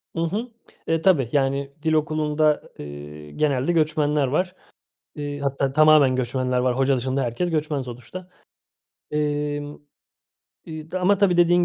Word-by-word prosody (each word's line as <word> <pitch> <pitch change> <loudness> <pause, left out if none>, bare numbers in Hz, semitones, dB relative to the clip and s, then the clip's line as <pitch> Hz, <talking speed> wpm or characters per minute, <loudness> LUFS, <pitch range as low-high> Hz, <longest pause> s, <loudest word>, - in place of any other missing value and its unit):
I 165 - -2
hı. 210 +9 -2 0.4
E, 165 0 +1
tabii. 160 - +3
Yani 140 0 0
dil 160 0 +1
okulunda, 155 0 +1 0.2
eee, 75 +1 -9
genelde 140 - 0
göçmenler 150 -3 +1
var. 180 +7 -1 0.6
Eee, 145 -1 -5
hatta 140 -1 -1
tamamen 155 -3 +6
göçmenler 125 0 -1
var. 125 0 +1
Hoca 135 0 +2
dışında 130 +2 -1
herkes 125 +10 -2
göçmen 150 -3 -1
sonuçta, 125 +9 -9 0.8
emm, 145 -1 -2 0.9
eee, 155 -1 -8
ama 185 +2 +2
tabii, 190 -4 +3
dediğin 175 0 +4
145 Hz, 135 wpm, -23 LUFS, 130-160 Hz, 0.9 s, tamamen